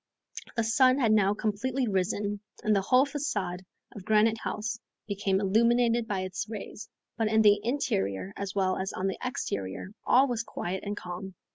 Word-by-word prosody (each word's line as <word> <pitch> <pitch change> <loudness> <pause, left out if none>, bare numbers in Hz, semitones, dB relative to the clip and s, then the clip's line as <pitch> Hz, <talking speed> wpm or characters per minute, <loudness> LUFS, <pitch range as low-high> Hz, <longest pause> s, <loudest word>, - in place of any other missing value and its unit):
The 230 - +2
sun 255 +3 +4
had 235 -6 +3
now 205 -1 +4
completely 240 +5 -1
risen, 205 +1 -1 0.2
and 215 -1 +3
the 195 - +3
whole 255 +7 +4
facade 205 - -3 0.3
of 200 - -10
Granite 220 +2 +3
House 220 +1 -3 0.3
became 200 -2 0
illuminated 230 +3 +3
by 195 -3 -1
its 185 +2 -4
rays; 215 0 -7 0.3
but 225 - +1
in 220 0 +3
the 205 -1 +6
interior 190 - -1
as 200 -1 -5
well 190 -2 +1
as 190 0 -3
on 185 - -3
the 195 - -2
exterior 100 - -4
all 265 +3 +5
was 240 -3 -1
quiet 190 -5 -4
and 205 0 -4
calm. 180 +1 -7
210 Hz, 170 wpm, -28 LUFS, 190-230 Hz, 0.3 s, the